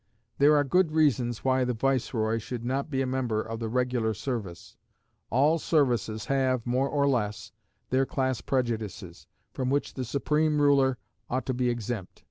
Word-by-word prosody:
There 145 +2 +6
are 145 - +4
good 160 +3 +2
reasons 125 -7 +1
why 130 0 +3
the 125 -1 -1
viceroy 115 -3 0
should 115 +1 -6
not 135 +4 -1
be 135 -2 0
a - - -1
member 125 -4 -1
of 110 +1 -4
the 115 -1 -3
regular 125 -2 0
service. 105 -7 -5 0.5
All 145 +7 +3
services 120 -9 +1
have, 130 -3 +1
more 130 +3 +1
or 140 -1 +1
less, 105 -6 -1 0.4
their 130 +1 +2
class 130 -3 -1
prejudices, 120 -6 -3 0.3
from 130 -1 -2
which 140 +1 0
the 130 - -4
supreme 150 +4 +1
ruler 140 -3 +4 0.3
ought 130 0 -1
to 130 - -1
be 125 0 0
exempt. 120 -4 -4
130 Hz, 165 wpm, -27 LUFS, 115-140 Hz, 0.5 s, There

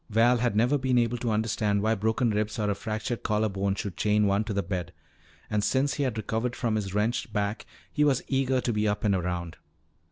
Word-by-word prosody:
Val 115 +3 +4
had 120 -3 0
never 125 +7 +3
been 130 -1 +1
able 120 0 +1
to 120 - -1
understand 105 -2 0
why 110 +1 +3
broken 110 +3 +1
ribs 105 +1 -1
or 105 -2 0
a - - +2
fractured 110 +3 -4
collar 110 0 +1
bone 95 0 -1
should 100 -3 -4
chain 105 +1 +2
one 100 +1 +2
to 110 - -5
the 100 -1 0
bed. 90 -3 -4 0.6
And 105 -1 0
since 135 +4 +1
he - - -3
had 120 -4 -2
recovered 115 +3 -2
from 120 -3 -1
his 100 -2 -3
wrenched 110 +2 0
back 105 0 -2 0.3
he 150 - +2
was 140 -3 +2
eager 130 -1 +1
to 120 - -1
be 105 0 +1
up 105 0 -1
and 105 -2 +3
around. 90 -2 -2
110 Hz, 225 wpm, -27 LUFS, 100-120 Hz, 0.6 s, Val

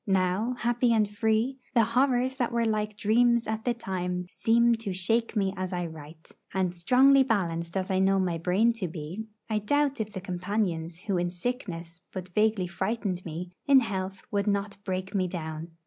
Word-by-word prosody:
Now, 195 +5 +1
happy 240 0 +2
and 215 -2 +3
free, 220 +5 0 0.2
the 230 - +6
horrors 255 +2 +2
that 245 -3 0
were 235 -1 +1
like 215 -1 -1
dreams 235 +2 +3
at 220 0 -3
the 245 -1 +1
time 180 -4 -3
seem 235 +5 +3
to 215 -4 -4
shake 225 +6 0
me 195 -2 +1
as 185 -1 -3
I 175 -1 -1
write; 160 0 -11 0.2
and 185 -2 +1
strongly 260 +10 +5
balanced 170 -8 0
as 190 0 -2
I 190 - +2
know 195 +1 +3
my 180 -3 0
brain 195 +8 +3
to 180 - 0
be, 170 +7 -6 0.2
I 215 -1 0
doubt 280 +4 +1
if 215 -1 -4
the 195 - -5
companions 180 -2 -2
who 200 -2 -1
in 175 0 0
sickness 175 -4 -5
but 185 -1 -6
vaguely 215 -2 +2
frightened 190 0 -2
me, 175 +2 -6 0.2
in 275 -2 +7
health 190 -3 -4
would 200 0 0
not 200 0 0
break 190 +1 -3
me 185 -2 +1
down. 160 -2 -5
200 Hz, 185 wpm, -28 LUFS, 180-230 Hz, 0.2 s, in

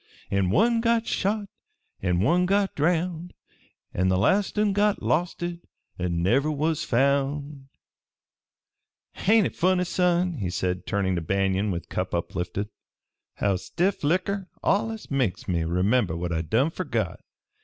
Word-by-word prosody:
An' 100 -2 +1
one 230 - +3
got 230 -1 +2
shot, 205 +1 -1 0.6
an' 90 -1 +1
one 175 - +3
got 200 0 +2
drowned, 170 +2 -1 0.6
An' 90 +1 +1
th' 95 - +2
last 190 - +2
un 210 -1 +2
got 205 +1 +1
losted 175 +1 -1 0.4
an' 85 -1 -1
never 135 +11 +2
was 155 +1 0
found_ 140 +2 0 1.6
"Ain't 220 +1 +6
hit - - -3
funny, 185 +1 +2
son," 180 -2 +1
said 90 0 -1
he, - - -15
turning 95 -2 -1
to 85 - -1
Banion 95 +3 0
with 85 -3 -4
cup - - -3
uplifted, 90 +4 -3 0.7
"how 100 -2 +1
stiff 180 - -1
likker 185 +5 0 0.2
allus 220 0 0
makes 125 -10 -1
me 85 -3 0
remember 90 +2 +1
what 85 0 -3
I 80 - 0
done 115 - +1
fergot? - - -2
145 Hz, 140 wpm, -25 LUFS, -, 1.6 s, Ain't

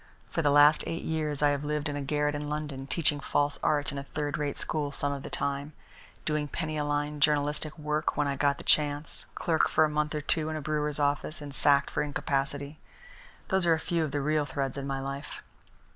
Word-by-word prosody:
For - - 0
the 145 - +3
last 145 +1 +6
eight 165 - -3
years 150 -2 -1
I 145 - +6
have 145 0 -1
lived 150 +1 -1
in 145 - -3
a 145 - -3
garret 150 +1 0
in 145 0 -4
London, 150 -3 -4
teaching 150 0 +1
false 145 0 0
art 145 -2 +1
in 140 - -4
a - - -6
third 145 +1 -3
rate 145 -1 -2
school 150 -2 -2
some 140 0 -1
of 140 - -5
the - - -7
time, 140 +2 -2 0.5
doing 150 -1 0
penny 155 +1 -3
a 150 - 0
line 145 0 -1
journalistic 150 +1 +1
work 150 0 -1
when 150 - +2
I 140 - 0
got 140 0 +2
the - - -9
chance; 150 0 +1
clerk 160 -2 +2
for 155 - +4
a - - -1
month 150 +1 -1
or 150 - -1
two 155 +1 +2
in 155 - -3
a - - -2
brewer's 150 -1 -1
office 145 +2 0
and 145 -1 -8
sacked 140 -1 +4
for - - 0
incapacity 140 0 -2 0.7
those 190 -3 +2
are 165 - +6
a - - -4
few 170 0 0
of 155 - -1
the 145 +1 -1
real 150 +1 +1
threads 135 -3 -2
in 140 -1 -4
my 135 -1 -2
life." 140 +2 -6
145 Hz, 230 wpm, -29 LUFS, 145-150 Hz, 0.7 s, last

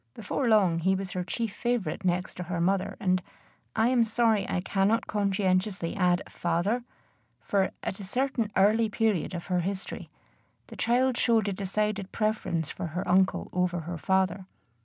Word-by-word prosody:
Before 235 +4 -1
long 190 -7 +4
he 190 +3 +2
was 190 -1 -4
her 180 - -2
chief 225 +3 -3
favorite 235 -4 -1
next 180 0 0
to 180 - -3
her 175 0 -3
mother 185 +2 0
and 185 -1 +1 0.5
I 225 +2 +3
am 250 -2 +4
sorry 225 -2 +2
I - - 0
cannot 195 +4 +1
conscientiously 195 -3 0
add 180 -3 +2
father; 175 +8 -1 0.6
for, 195 -2 +1
at 190 - -4
a - - -6
certain 235 +1 -1
early 215 +3 +4
period 210 -5 0
of 170 - -5
her 180 -2 0
history, 190 +3 -4 0.6
the - - -11
child 250 +2 +2
showed 225 -3 +3
a - - -2
decided 200 +1 -2
preference 215 -7 -1
for - - -5
her 180 - -2
uncle 190 +1 +2
over 180 -1 0
her 170 +1 -6
father. 190 +1 +1
195 Hz, 165 wpm, -28 LUFS, 180-220 Hz, 0.6 s, long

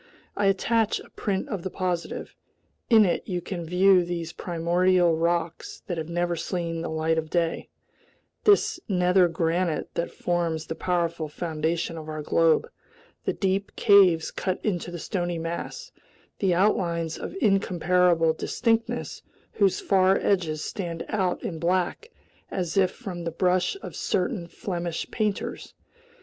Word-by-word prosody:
I 205 - +1
attach 220 +3 +2
a - - -14
print 195 -2 -2
of 200 - -3
the 190 - -4
positive. 180 -2 -3 0.6
In 220 -3 +7
it 175 - +1
you 180 -3 -1
can 175 0 -5
view 180 +2 +4
these 170 -1 -4
primordial 175 0 +2
rocks 170 0 -2
that 175 -3 -3
have 160 +1 -5
never 175 0 0
seen 170 0 -3
the - - -4
light 160 +1 +1
of 155 -1 -6
day, 170 -1 -1 0.7
this 405 -3 +4
nether 180 -1 +4
granite 165 0 -1
that 170 - -2
forms 170 -2 -1
the - - -4
powerful 170 -2 -1
foundation 160 +1 -2
of 155 0 -9
our 155 -1 -4
globe, 165 - +3 0.6
the - - +1
deep 195 +1 -1
caves 190 -6 +5
cut 185 -1 -2
into 180 -5 -1
the 175 - -6
stony 175 0 -2
mass, 170 - -5 0.5
the 195 -2 +2
outlines 170 -4 +1
of - - -6
incomparable 180 - +3
distinctness 230 +7 -1 0.3
whose 195 -3 +2
far 190 -1 +3
edges 165 -6 0
stand 170 -5 -4
out 190 -4 0
in 165 -3 -4
black 180 - 0 0.4
as 175 -3 -3
if 190 -2 +4
from 185 -6 -7
the 170 - -2
brush 180 - +1
of - - -7
certain 180 -1 -1
Flemish 175 -4 -4
painters. 210 -3 -3
175 Hz, 145 wpm, -26 LUFS, 165-190 Hz, 0.7 s, In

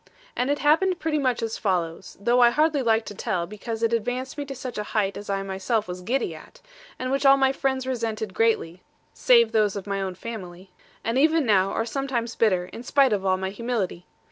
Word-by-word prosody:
And 250 +2 0
it 290 - +1
happened 330 +6 +3
pretty 315 -3 -1
much 255 -4 0
as 225 0 -3
follows 180 -3 -2
though 235 +5 +2
I 240 -1 +7
hardly 300 +2 +2
like 225 -2 +2
to - - -7
tell, 180 -3 -2
because 220 +4 -6
it 230 0 +2
advanced 245 +3 -2
me 290 -1 -4
to 275 -1 -7
such 255 -3 -6
a - - -1
height 200 -2 +1
as 205 - -8
I 195 0 -1
myself 195 +3 -1
was 180 0 -6
giddy 235 -2 -1
at; 160 - -14 0.4
and 255 0 -3
which 275 +1 0
all 275 0 +7
my 265 -1 +3
friends 265 -1 -1
resented 225 -5 -3
greatly 185 -6 0 0.3
(save 470 -2 +4
those 210 -2 +2
of 200 - -5
my 200 -1 -2
own 190 -1 -3
family), 185 -4 -8 0.3
and 230 +3 0
even 315 +1 +3
now 195 -3 +3
are 225 - -1
sometimes 240 -2 -2
bitter, 185 -6 +2
in 230 - -7
spite 265 -1 +3
of 200 -2 -1
all 185 0 +3
my 190 0 -3
humility. 210 -6 -3
230 Hz, 220 wpm, -25 LUFS, 195-265 Hz, 0.4 s, I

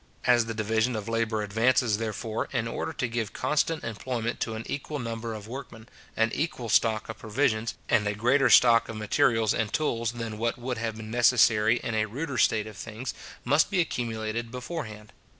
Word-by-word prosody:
As 120 -2 +4
the 115 - -4
division 110 +3 +1
of 110 0 -4
labour 115 -2 0
advances, 110 +1 +2
therefore, 110 0 -3
in 120 -3 -1
order 115 - -3
to 125 - -2
give 115 -2 -3
constant 155 +1 0
employment 115 +1 -3
to 110 - -2
an 110 - -5
equal 145 +1 -4
number 115 -2 -4
of 105 -1 -9
workmen, 120 -3 -9 0.3
an 115 0 +2
equal 130 -7 -2
stock 110 0 +2
of 110 - -7
provisions, 115 -1 0
and 105 -3 +2
a 105 - -1
greater 130 +5 +3
stock 115 -2 +6
of 110 - -5
materials 110 +1 +2
and 110 -2 -1
tools 115 -6 0
than 115 -2 -5
what 115 +1 0
would 125 -1 -4
have 115 -1 -3
been 110 0 -8
necessary 115 -2 +4
in 115 - -2
a 110 0 +1
ruder 135 +3 -4
state 110 -3 +3
of 110 -2 -10
things, 115 +5 -6 0.3
must 145 +5 +3
be 195 - 0
accumulated 115 -6 -2
before 130 +6 -5
hand. 105 -1 -11
115 Hz, 190 wpm, -27 LUFS, 110-125 Hz, 0.3 s, stock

